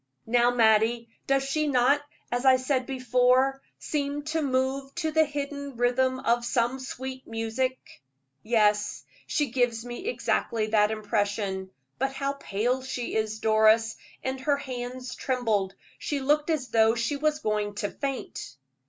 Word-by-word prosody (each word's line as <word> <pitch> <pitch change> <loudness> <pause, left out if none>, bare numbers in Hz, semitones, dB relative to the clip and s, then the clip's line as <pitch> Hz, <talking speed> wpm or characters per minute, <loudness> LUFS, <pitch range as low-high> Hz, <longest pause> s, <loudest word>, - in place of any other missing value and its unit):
Now, 240 +1 +4
Mattie, 230 0 +3 0.2
does 275 0 +2
she 300 +3 0
not, 275 +1 +3 0.3
as 245 +1 -1
I 265 -1 +7
said 255 0 0
before, 255 +1 +2 0.2
seem 290 -1 -2
to 315 +1 -1
move 270 0 -1
to 320 -2 -1
the 315 0 +4
hidden 280 -2 -5
rhythm 255 +2 +2
of 235 0 +2
some 240 +2 0
sweet 260 0 -7
music?" 225 +3 -1 0.6
"Yes, 210 -2 +2 0.2
she 290 -5 0
gives 245 -2 0
me 245 - -6
exactly 230 - 0
that 210 -1 +3
impression. 205 -3 -1 0.3
But 270 +1 0
how 275 +1 -1
pale 250 -1 -1
she 255 -2 -4
is, 220 0 -1
Doris, 220 +1 +4 0.3
and 260 0 -2
her 285 +2 +1
hands 250 -1 -6
trembled. 220 -7 -1 0.2
She 290 - -2
looked 295 +3 +1
as 295 -6 -1
though 225 0 +4
she 235 +5 -1
was 300 +1 +1
going 210 -6 -1
to 205 0 -2
faint." 270 - -5
250 Hz, 145 wpm, -27 LUFS, 225-275 Hz, 0.6 s, I